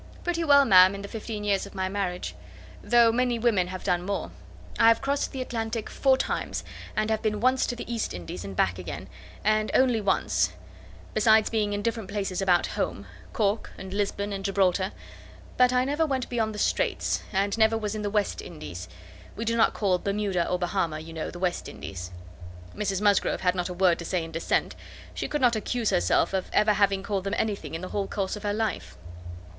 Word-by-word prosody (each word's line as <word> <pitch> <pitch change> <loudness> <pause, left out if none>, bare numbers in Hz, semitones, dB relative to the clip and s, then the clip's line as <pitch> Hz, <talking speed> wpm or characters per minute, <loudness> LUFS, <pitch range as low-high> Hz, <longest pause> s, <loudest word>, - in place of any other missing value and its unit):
"Pretty 340 -1 -1
well, 285 -3 +6
ma'am 185 -2 +7
in 200 - -7
the - - -5
fifteen 215 0 -5
years 200 -1 0
of 200 - -14
my 190 -1 -1
marriage; 180 - -3 0.5
though 235 -1 +5
many 245 0 +1
women 220 -6 +2
have 185 0 -6
done 175 -1 +1
more. 185 - -3 0.5
I - - +6
have 230 0 +6
crossed 280 +1 -1
the 260 -1 -3
Atlantic 225 -2 -4
four 265 -1 +3
times, - - -2 0.3
and 215 +1 0
have 220 0 0
been 215 -2 -1
once 255 +3 +2
to 245 - -2
the 240 0 -6
East 230 - -2
Indies, 90 0 -6
and 100 -1 -7
back 90 0 +1
again, 90 - -6 0.4
and 215 +1 +2
only 250 -4 +4
once; 195 -2 +1 0.6
besides 220 0 +4
being 215 -2 +1
in 205 0 -2
different 225 -3 -2
places 195 -2 -2
about 180 -2 +3
home: - - -3 0.3
Cork, 210 0 -1
and 190 0 -8
Lisbon, 200 0 -1
and 195 0 -4
Gibraltar. 190 -1 +1 0.6
But 250 0 +5
I 250 0 +2
never 295 +4 +1
went 260 -3 -2
beyond 220 -3 -1
the - - -6
Streights, - - 0
and 200 0 +1
never 225 0 +3
was 210 -2 -3
in 215 - -4
the 205 - -1
West 205 0 0
Indies. 90 - -8 0.5
We 230 - -4
do 230 +1 +1
not 225 - +3
call 190 -4 +1
Bermuda 200 -3 -1
or 180 - +1
Bahama, 175 -3 -1
you 160 +1 -9
know, 160 -1 -4
the - - -9
West 180 -1 -2
Indies." 90 -1 -7 0.7
Mrs 195 -2 -1
Musgrove 205 -2 +2
had 180 -1 +2
not 180 0 -2
a - - -4
word 180 -2 +3
to 170 - -6
say 175 0 -1
in 165 - -8
dissent; 165 +1 0 0.4
she - - -3
could 295 - -2
not 245 -2 +4
accuse 225 +1 -1
herself 90 - +2
of 190 -1 -1
having 210 0 +3 0.3
ever - - -11
called 195 -3 -1
them 200 +2 -2
anything 205 -6 -2
in 165 - -5
the 185 - -6
whole 200 -1 -2
course 195 -1 -2
of 210 - -8
her 205 0 -1
life. 220 -1 -3
205 Hz, 210 wpm, -27 LUFS, 185-225 Hz, 0.7 s, ma'am